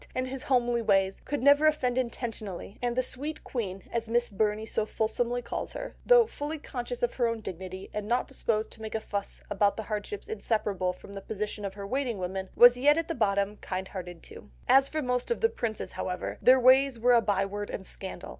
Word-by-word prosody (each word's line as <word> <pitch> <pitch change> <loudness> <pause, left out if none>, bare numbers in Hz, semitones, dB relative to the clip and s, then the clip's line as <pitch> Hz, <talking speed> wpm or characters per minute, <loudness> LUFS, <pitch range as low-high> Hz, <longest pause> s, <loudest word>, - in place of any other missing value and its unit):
and 255 0 -1
his 265 0 -5
homely 240 -3 +2
ways, 195 -3 +2
could 285 -3 -2
never 285 +2 +6
offend 255 -5 +1
intentionally, 225 -6 -4
and 240 -1 0
the 255 - +2
"sweet 295 +6 -3
queen," 195 -6 -4
as 230 -1 -2
Miss 240 0 +1
Burney 210 +1 0
so 220 - 0
fulsomely 240 +3 -1
calls - - -4
her, - - -6
though - - +7
fully 310 -6 -5
conscious 245 -4 -5
of 240 - +1
her 240 -2 +1
own 230 -1 -2
dignity, 185 -1 -7
and 210 -1 -3
not 245 +3 +1
disposed 225 -5 -1
to 220 - -10
make 220 0 -5
a - - +1
fuss 200 -2 -5
about 200 0 +2
the 220 - -3
hardships 215 - -4
inseparable 210 - -1
from 190 +2 -13
the 195 - -6
position 210 0 -4
of 195 -1 -4
her 200 -1 -6
waiting 250 0 -1
women, 190 +1 -4
was 245 0 +8
yet 290 +4 +5
at 330 0 -1
the - - 0
bottom 200 -4 +1
kind 190 -1 -4
hearted 175 -3 -7
too. - - -12 0.2
As 270 +1 +6
for 310 -1 -2
most 250 -1 -1
of 475 - 0
the 455 - +3
princes, 225 - -4
however, 180 0 -4
their 260 +1 +7
ways 260 +1 +5
were 245 +2 +4
a 235 - +6
byword 205 0 -1
and 190 - -5
scandal. 190 0 -7
230 Hz, 215 wpm, -29 LUFS, 200-255 Hz, 0.2 s, was